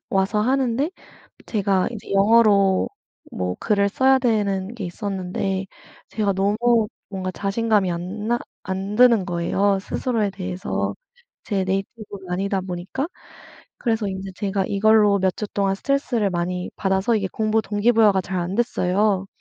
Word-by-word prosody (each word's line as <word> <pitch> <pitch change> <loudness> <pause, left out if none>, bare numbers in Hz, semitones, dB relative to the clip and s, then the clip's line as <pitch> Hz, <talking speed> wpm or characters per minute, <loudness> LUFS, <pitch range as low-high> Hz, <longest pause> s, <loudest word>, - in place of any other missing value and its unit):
와서 195 +2 +1
하는데 260 +4 +1 0.6
제가 195 -3 +1
이제 225 -4 -9
영어로 200 -2 +4 0.4
뭐 90 0 -3
글을 200 -2 +2
써야 265 +5 +4
되는 210 -4 0
게 215 - -5
있었는데 190 0 -3 0.4
제가 210 -2 0
너무 215 +3 +2 0.2
뭔가 190 -2 -4
자신감이 200 0 0
안나 205 +7 -2 0.2
안 190 +2 -4
드는 235 -5 +6
거예요 195 +3 +1
스스로에 220 0 -1
대해서. 185 -1 -3 0.5
제 195 -3 0
네이티브도 195 +2 -4
아니다 195 +2 -1
보니까. 185 - -4 0.7
그래서 225 -3 0
인제 190 0 -5
제가 195 0 -1
이걸로 210 0 +4
몇 190 -1 0
주 210 - -3
동안 195 -1 +1
스트레스를 245 -4 0
많이 180 +1 -2
받아서 195 +3 +1
이게 195 -3 -1
공부 220 0 +1
동기부여가 210 -1 +3
잘 185 +1 -3
안됐어요. 195 0 0
200 Hz, 305 characters per minute, -22 LUFS, 190-220 Hz, 0.7 s, 드는